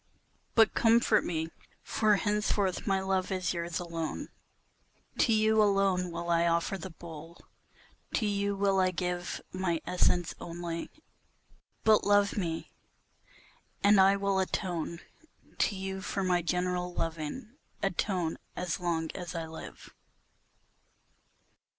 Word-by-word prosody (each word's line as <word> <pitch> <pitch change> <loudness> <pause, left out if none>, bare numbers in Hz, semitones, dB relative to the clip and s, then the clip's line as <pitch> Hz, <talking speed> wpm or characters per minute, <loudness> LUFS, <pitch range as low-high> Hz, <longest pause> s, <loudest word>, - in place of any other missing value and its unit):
But 225 -1 +6
comfort 225 -2 +4
me, 160 -1 -2 0.3
for 215 -1 +3
henceforth 205 -2 0
my 195 -1 +2
love 190 0 0
is 185 -2 0
yours 170 -1 -3
alone, 165 -2 -4 0.9
To 235 - +4
you 220 0 +4
alone 195 -3 +2
will 170 0 -3
I 170 0 +3
offer 170 +3 +1
the 190 0 -6
bowl, 165 -1 -10 0.8
to 220 - +1
you 200 -1 0
will 195 -1 +2
I 185 -1 +4
give 180 0 -3
My 185 -3 0
essence 175 -1 +2
only, 170 -1 -5 0.9
but 220 -1 +5
love 205 0 +3
me, 165 -5 -3 1.1
and 200 -1 +7
I 195 +1 +6
will 200 -1 +1
atone 175 -3 -2 0.6
To 205 - +2
you 190 0 -4
for 195 +1 -2
my 180 -1 +2
general 180 +1 -1
loving, 165 - -4 0.3
atone 180 -3 -1 0.2
as 180 -1 -2
long 165 -2 -1
as 180 -1 -6
I 165 -1 -2
live. 160 0 -10
185 Hz, 125 wpm, -30 LUFS, 170-200 Hz, 1.1 s, and